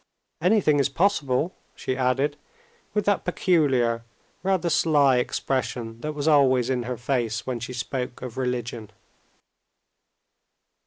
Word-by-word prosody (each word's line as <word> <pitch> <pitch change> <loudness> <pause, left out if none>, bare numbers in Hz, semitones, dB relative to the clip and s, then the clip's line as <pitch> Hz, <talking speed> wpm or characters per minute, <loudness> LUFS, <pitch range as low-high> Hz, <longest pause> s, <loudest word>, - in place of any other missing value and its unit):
"Anything 180 -5 +3
is 140 - +2
possible," 155 -2 +1 0.2
she 130 - -3
added 135 +3 +1 0.6
with 210 - +1
that 205 -1 +2
peculiar, 135 -11 +2 0.4
rather 185 -1 +1
sly 145 -6 +4
expression 125 -2 -2
that 155 0 -3
was 145 +1 -2
always 130 -4 +4
in 125 -2 0
her 125 - -3
face 120 -3 -1
when 125 -2 -3
she 120 +2 -6
spoke 125 0 -4
of 125 -3 -6
religion. 120 -4 -3
130 Hz, 120 wpm, -25 LUFS, 125-155 Hz, 0.6 s, sly